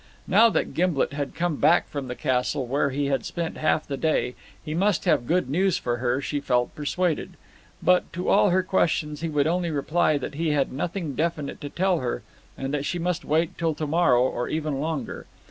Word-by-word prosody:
Now 220 +5 +6
that - - -1
Gimblet 170 -5 +1
had 140 -1 -4
come 170 -3 -1
back 165 +4 +4
from 140 -3 -5
the 125 - -5
castle, 130 +1 0
where 140 +3 +1
he 140 +2 -1
had 135 -4 0
spent 170 -2 -4
half 155 0 +1
the 140 - -4
day, 155 -3 0 0.3
he 155 - -3
must 190 +2 +1
have 120 - +2
good 175 -4 +1
news 185 +6 +2
for 120 0 -2
her, 125 +1 0
she 140 +1 -2
felt 125 -3 0
persuaded. 160 +2 -2 0.5
But 180 +1 +3
to 180 +1 -4
all 205 0 +5
her 185 +1 +2
questions 155 -5 0
he 165 - -2
would 145 -2 +1
only 175 +2 0
reply 155 +1 +1
that 140 - -5
he 155 +1 0
had 140 -3 0
nothing 165 +2 -3
definite 155 -1 -2
to 145 - -5
tell 185 +2 +1
her, - - -3 0.3
and 135 +1 -4
that 145 -1 -1
she 175 - -2
must 175 0 -1
wait 160 +2 0
till 165 -2 0
to 155 - -3
morrow 145 -6 +3
or 125 -1 -1
even 155 -3 -2
longer. 150 -5 -4
155 Hz, 210 wpm, -25 LUFS, 140-175 Hz, 0.5 s, Now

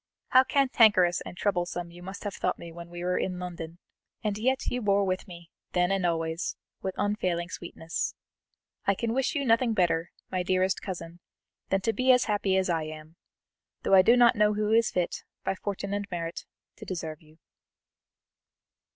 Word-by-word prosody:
How 260 +1 +7
cantankerous 225 -10 +4
and 175 - -9
troublesome 175 -3 -1
you 175 +1 -12
must 190 +2 -8
have 205 -2 -3
thought - - -1
me 170 - -9
when 170 +1 -10
we 175 0 -7
were 180 0 +1
in 185 -1 -2
London! 170 -2 -6 0.5
and 210 -2 0
yet 260 +5 0
you 250 - -1
bore 200 -1 +3
with 185 +1 -1
me, 170 -2 -12 0.2
then 180 +1 +2
and 190 -2 +2
always, 165 0 -1 0.3
with 190 -1 -3
unfailing 185 -4 0
sweetness. 170 -2 -4 0.7
I 200 - +4
can 230 +3 -1
wish 265 +6 0
you 280 -2 0
nothing 230 0 +3
better, 175 -2 +2 0.2
my 185 - 0
dearest 185 +1 +1
cousin, 170 -3 -6 0.5
than 195 0 +2
to 225 +3 +1
be 255 +2 +4
as 250 -1 +5
happy 205 -3 +1
as 190 - +2
I 165 -3 0
am, 155 +1 -9 0.7
though - - +1
I 190 - +9
do 235 +6 +5
not 240 0 +6
know 210 0 +3
who 210 0 0
is 230 0 +4
fit, 180 -1 -2 0.2
by 190 - 0
fortune 200 0 -4
and 205 0 -2
merit, 170 -1 -4 0.3
to - - -10
deserve 160 -4 -5
you." 155 0 -21
185 Hz, 185 wpm, -28 LUFS, 175-210 Hz, 0.7 s, I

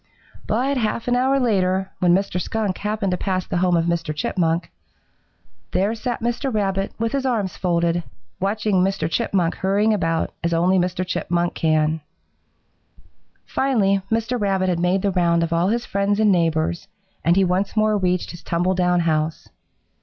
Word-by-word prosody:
"But 265 +5 0
half 225 0 -1
an 245 - +2
hour 265 +2 +2
later, 190 -5 +1
when 180 -1 +3
Mr. 190 -2 -1
Skunk 215 -3 -2
happened 210 -2 -1
to 180 - 0
pass 185 -2 -1
the - - -2
home 180 -1 +2
of 165 - +1
Mr. 165 -3 -1
Chipmunk, 165 +1 -1 1.0
there 200 +4 +1
sat 235 +1 -4
Mr. 240 +3 -1
Rabbit 195 -3 -1
with 230 0 -1
his 275 -1 -1
arms 220 -9 -1
folded, 170 -1 0 0.4
watching 205 +1 0
Mr. 195 -1 +1
Chipmunk 170 +1 0
hurrying 205 +3 +2
about 165 -5 -1
as 170 0 +1
only 180 +3 +3
Mr. 180 +1 -1
Chipmunk 175 -1 -1
can. 155 0 +1 1.4
"Finally 205 -8 +1
Mr. 230 +1 -1
Rabbit 190 -2 +1
had 175 -2 0
made 180 +2 +1
the 200 - +2
round 170 -2 +2
of 165 0 -2
all 170 +2 +2
his 235 +3 0
friends 200 +1 0
and 215 -2 +4
neighbors, 165 +1 0 0.4
and 170 +1 +3
he 195 - +4
once 190 +4 0
more 215 0 +3
reached 180 -2 0
his 175 - -10
tumble 175 +3 0
down 180 -1 +2
house. 155 -1 -1
185 Hz, 170 wpm, -22 LUFS, 170-210 Hz, 1.4 s, and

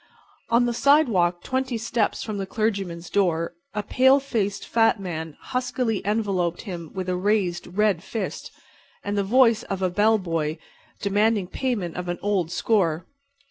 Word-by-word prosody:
On 235 +1 +4
the 240 - 0
sidewalk, 225 - +3
twenty 260 -2 -1
steps 225 -1 -1
from 215 -2 -4
the 195 - -3
clergyman's 195 -6 -2
door, 170 -5 0 0.2
a 210 - -1
pale 260 +6 +4
faced, 205 -7 -2
fat 225 -1 +3
man 160 -5 -5
huskily 250 -4 -2
enveloped 195 -5 0
him 175 -6 -6
with 185 -1 -3
a 180 - 0
raised, 185 -2 0
red 210 -5 +3
fist 225 +4 -5 0.5
and 205 0 -2
the 200 - +1
voice 230 +1 +4
of 195 -1 -4
a 185 - +1
bell 215 +4 +4
buoy, 165 -4 -2 0.4
demanding 205 0 +2
payment 200 -5 -3
of 180 0 -4
an 175 0 -2
old 195 -5 +1
score. 175 -3 +1
200 Hz, 155 wpm, -24 LUFS, 175-225 Hz, 0.5 s, On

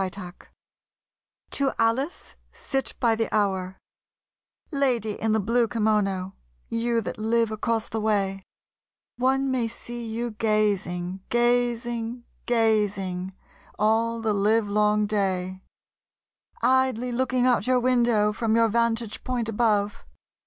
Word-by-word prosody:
Y 190 - 0
Z 180 -3 -8 1.2
To 275 -1 +1
Alice 235 +8 -1 0.2
Sit 270 -2 -3
By 235 -3 +3
The 225 0 -1
Hour 190 -3 0 0.9
LADY 250 -7 0
in 220 - +1
the 220 - +2
blue 230 +3 +2
kimono, 205 -4 0 0.4
you 230 0 0
that 215 - -6
live 225 +1 +1
across 225 +1 -1
the 220 - -3
way, 200 -3 0 0.8
One 265 +2 +1
may 250 -3 0
see 240 +1 -6
you 230 +1 -3
gazing, 200 -4 0
gazing 240 0 0 0.2
gazing 205 -5 +1 0.4
all 225 +2 +1
the 220 -1 +1
livelong 210 0 +2
day, 190 -3 -1 1.0
Idly 255 -2 +2
looking 255 0 +1
out 245 -4 +2
your 255 0 +3
window 240 -4 +2
from 220 0 0
your 230 0 +4
vantage 230 -1 0
point 245 -3 -2
above. 210 -2 +1
225 Hz, 115 wpm, -25 LUFS, 210-240 Hz, 1.2 s, your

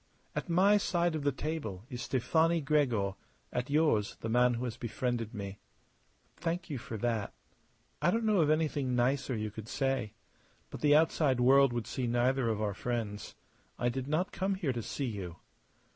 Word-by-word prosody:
At - - -3
my 195 +5 +5
side 175 -4 +1
of 155 - -2
the 145 - +2
table 130 - -4
is 125 -3 -6
Stefani 160 +6 +2
Gregor; 130 -10 +1 0.4
at 125 +2 -2
yours 145 -9 +2
the 115 - -3
man 125 +1 +4
who 120 - -3
has 120 -3 -3
befriended 120 -1 -2
me." 100 -3 -6 0.8
"Thank 175 0 -3
you 135 - -3
for 115 -1 -6
that. 115 -2 -1 0.7
I - - +4
don't 225 +4 +1
know 210 -5 +4
of 150 - +3
anything 150 -5 +1
nicer 130 +1 +1
you 110 0 -3
could 110 +1 -8
say. 135 -5 -1 0.6
But - - -7
the 145 -1 +5
outside 150 -4 +3
world 135 +2 +6
would 120 -2 -2
see 125 +2 -3
neither 120 +1 +2
of 110 -2 -1
our 105 -1 0
friends. 110 -1 -4 0.4
I 120 - +1
did 130 +2 -4
not 160 +6 0
come 195 +1 -1
here 165 -9 -1
to 120 - -3
see 135 +5 -3
you." 100 -7 -5
130 Hz, 180 wpm, -31 LUFS, 115-155 Hz, 0.8 s, world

